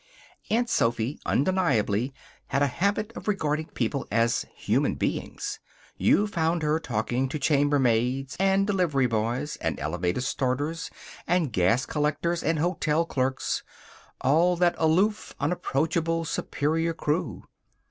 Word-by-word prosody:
Aunt 240 Hz, +2 st, +2 dB
Sophy 115 Hz, -, 0 dB
undeniably 130 Hz, -, +1 dB, 0.4 s
had 140 Hz, +1 st, +1 dB
a -, -, +5 dB
habit 200 Hz, -, 0 dB
of -, -, -8 dB
regarding 155 Hz, -6 st, 0 dB
people 130 Hz, -2 st, -2 dB
as 115 Hz, +1 st, +1 dB
human -, -, +1 dB
beings. -, -, -3 dB, 0.4 s
You 205 Hz, -, +3 dB
found 165 Hz, -4 st, 0 dB
her 150 Hz, +1 st, +2 dB
talking 125 Hz, 0 st, -1 dB
to 155 Hz, -, -3 dB
chambermaids 135 Hz, -3 st, +2 dB
and 195 Hz, 0 st, +3 dB
delivery 180 Hz, -10 st, +1 dB
boys, 120 Hz, +5 st, -1 dB
and -, -, -2 dB
elevator 85 Hz, -, -1 dB
starters, 140 Hz, +5 st, -1 dB, 0.4 s
and 165 Hz, -8 st, +1 dB
gas 95 Hz, +8 st, +2 dB
collectors, 155 Hz, +3 st, -1 dB
and 160 Hz, +1 st, +1 dB
hotel 165 Hz, -1 st, +1 dB
clerks 130 Hz, -4 st, -1 dB, 0.6 s
all 165 Hz, +6 st, +3 dB
that 175 Hz, 0 st, +3 dB
aloof, 185 Hz, +7 st, +1 dB
unapproachable, 165 Hz, +2 st, 0 dB
superior 160 Hz, +1 st, -1 dB
crew. 150 Hz, +1 st, -2 dB
150 Hz, 120 wpm, -26 LUFS, 130-170 Hz, 0.6 s, a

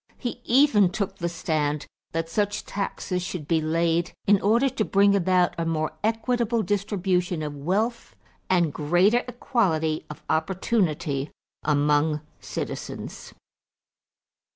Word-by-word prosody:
He 245 Hz, -1 st, -5 dB
even 240 Hz, -7 st, +5 dB
took 195 Hz, 0 st, -3 dB
the 170 Hz, -1 st, -1 dB
stand 150 Hz, -3 st, -1 dB, 0.3 s
that 165 Hz, 0 st, -2 dB
such 205 Hz, +4 st, -1 dB
taxes 195 Hz, -2 st, -3 dB
should 175 Hz, -4 st, -5 dB
be 160 Hz, -1 st, +2 dB
laid 165 Hz, +2 st, +1 dB
in 200 Hz, -1 st, +4 dB
order 230 Hz, +7 st, +3 dB
to 235 Hz, -4 st, -1 dB
bring 200 Hz, 0 st, +4 dB
about 180 Hz, -1 st, +3 dB
a -, -, +1 dB
more 155 Hz, -1 st, 0 dB
equitable 230 Hz, +1 st, +1 dB
distribution 190 Hz, -5 st, 0 dB
of 150 Hz, -1 st, -4 dB
wealth 200 Hz, -, -1 dB, 0.3 s
and 175 Hz, -5 st, +2 dB
greater 175 Hz, +10 st, +3 dB
equality 180 Hz, -, 0 dB
of 150 Hz, -, -9 dB
opportunity 160 Hz, -5 st, 0 dB, 0.3 s
among 150 Hz, +1 st, +2 dB, 0.2 s
citizens. -, -, -6 dB
180 Hz, 120 wpm, -25 LUFS, 155-210 Hz, 0.3 s, even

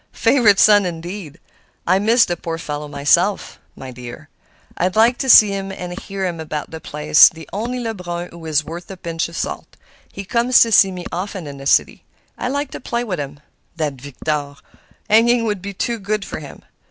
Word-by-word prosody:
Favorite 230 Hz, -5 st, +4 dB
son, 205 Hz, 0 st, +6 dB
indeed! 170 Hz, -1 st, -7 dB, 0.5 s
I 185 Hz, +2 st, +3 dB
miss 225 Hz, +3 st, +4 dB
the 175 Hz, -, -2 dB
poor 165 Hz, -1 st, -5 dB
fellow 150 Hz, -2 st, -5 dB
myself, 150 Hz, +7 st, +1 dB, 0.2 s
my 130 Hz, -1 st, -9 dB
dear. 120 Hz, -1 st, -10 dB, 0.5 s
I 180 Hz, -, +1 dB
liked 225 Hz, +6 st, +2 dB
to 265 Hz, -, -2 dB
see 215 Hz, -3 st, +9 dB
him 195 Hz, -1 st, -4 dB
and 180 Hz, -2 st, -7 dB
to -, -, -8 dB
hear 195 Hz, -1 st, -4 dB
him 170 Hz, -2 st, -3 dB
about 155 Hz, -1 st, -5 dB
the 160 Hz, -1 st, -8 dB
place—the 155 Hz, +2 st, +4 dB
only 235 Hz, +5 st, -3 dB
Lebrun 180 Hz, -7 st, -5 dB
who 170 Hz, -1 st, -12 dB
is 155 Hz, -1 st, +1 dB
worth 170 Hz, +4 st, -9 dB
a 195 Hz, -, -8 dB
pinch 165 Hz, -2 st, -3 dB
of 170 Hz, -, -9 dB
salt. -, -, -5 dB, 0.3 s
He 200 Hz, -, -8 dB
comes 235 Hz, +4 st, +3 dB
to 230 Hz, -, +4 dB
see 195 Hz, -2 st, +6 dB
me 180 Hz, -1 st, -7 dB
often 185 Hz, 0 st, -5 dB
in 140 Hz, -1 st, -8 dB
the 135 Hz, -, -5 dB
city. -, -, +2 dB, 0.3 s
I -, -, -4 dB
like 285 Hz, +2 st, -3 dB
to -, -, -7 dB
play 240 Hz, -1 st, -3 dB
to 205 Hz, -6 st, -3 dB
him. 145 Hz, -2 st, -7 dB, 0.3 s
That 155 Hz, -4 st, -2 dB
Victor! 145 Hz, +1 st, -4 dB, 0.5 s
hanging 230 Hz, +2 st, +4 dB
would 205 Hz, -4 st, -2 dB
be 200 Hz, +1 st, -6 dB
too 230 Hz, +4 st, -3 dB
good 205 Hz, 0 st, -2 dB
for -, -, -6 dB
him. 145 Hz, -3 st, -12 dB
180 Hz, 200 wpm, -19 LUFS, 155-215 Hz, 0.5 s, see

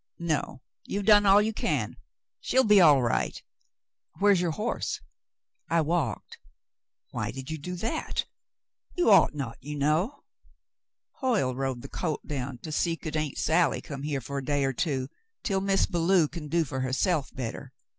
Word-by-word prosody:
"No, 155 Hz, -6 st, -2 dB, 0.2 s
you've 200 Hz, 0 st, -3 dB
done 205 Hz, -1 st, +6 dB
all 200 Hz, +2 st, +7 dB
you 220 Hz, +1 st, -1 dB
can. -, -, -1 dB, 0.4 s
She'll 260 Hz, -, +2 dB
be 210 Hz, -4 st, +6 dB
all 145 Hz, -6 st, +6 dB
right. 120 Hz, -, 0 dB, 0.8 s
Where's 200 Hz, -2 st, +4 dB
your 175 Hz, -, +1 dB
horse? 155 Hz, -, -2 dB, 0.4 s
" -, -, -65 dB, 0.3 s
"I 165 Hz, 0 st, +3 dB
walked." 165 Hz, +1 st, -2 dB, 0.7 s
"Why -, -, -3 dB
did 135 Hz, +3 st, -7 dB
you 160 Hz, -, -4 dB
do 180 Hz, +5 st, -5 dB
that? 220 Hz, +6 st, -2 dB, 0.7 s
You 355 Hz, -, +3 dB
ought 195 Hz, -6 st, +6 dB
not, 130 Hz, -5 st, -5 dB
you 150 Hz, +3 st, -6 dB
know." 160 Hz, -, 0 dB, 1.0 s
"Hoyle 225 Hz, -, +1 dB
rode 130 Hz, -1 st, -3 dB
the -, -, -7 dB
colt 160 Hz, -5 st, -3 dB
down 135 Hz, -3 st, -4 dB
to 155 Hz, -, -6 dB
see 165 Hz, +2 st, 0 dB
could 155 Hz, -1 st, -6 dB
Aunt 155 Hz, -3 st, -2 dB
Sally 165 Hz, +2 st, +2 dB
come 140 Hz, -2 st, -7 dB
here 145 Hz, -2 st, -2 dB
for 140 Hz, +3 st, -4 dB
a -, -, -7 dB
day 145 Hz, +1 st, 0 dB
or 135 Hz, -, 0 dB
two, 130 Hz, -2 st, -1 dB, 0.4 s
until 195 Hz, -2 st, 0 dB
Miz 195 Hz, 0 st, +2 dB
Belew 170 Hz, -1 st, +2 dB
can 155 Hz, 0 st, -7 dB
do 165 Hz, +2 st, +2 dB
for 130 Hz, -1 st, -4 dB
herself 135 Hz, +4 st, 0 dB
better." 120 Hz, -4 st, -5 dB
155 Hz, 170 wpm, -27 LUFS, 140-190 Hz, 1.0 s, all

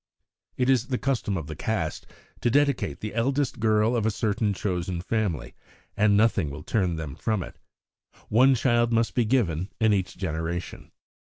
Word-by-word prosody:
"It 125 Hz, -, +1 dB
is 130 Hz, -2 st, +3 dB
the 130 Hz, -, -1 dB
custom 120 Hz, -8 st, -1 dB
of 80 Hz, -, -4 dB
the 80 Hz, +1 st, -7 dB
Caste 95 Hz, -2 st, -3 dB, 0.3 s
to -, -, +1 dB
dedicate 140 Hz, -, +1 dB
the 110 Hz, -, -5 dB
eldest 135 Hz, +4 st, 0 dB
girl 110 Hz, +1 st, +2 dB
of 115 Hz, -, 0 dB
a 110 Hz, -, +2 dB
certain 105 Hz, 0 st, 0 dB
chosen 90 Hz, -3 st, -2 dB
family, 90 Hz, -, -2 dB, 0.4 s
and 105 Hz, -1 st, +4 dB
nothing 105 Hz, -7 st, +2 dB
will 75 Hz, +2 st, -8 dB
turn 95 Hz, -6 st, 0 dB
them 80 Hz, -4 st, -5 dB
from 110 Hz, -, -1 dB
it. -, -, -12 dB, 0.7 s
One 130 Hz, +5 st, +5 dB
child 120 Hz, -1 st, +2 dB
must 115 Hz, -4 st, +1 dB
be 120 Hz, -, +2 dB
given 100 Hz, -7 st, +1 dB
in 110 Hz, -2 st, +4 dB
each 95 Hz, -2 st, -1 dB
generation." 85 Hz, -1 st, -4 dB
105 Hz, 170 wpm, -26 LUFS, 90-120 Hz, 0.7 s, One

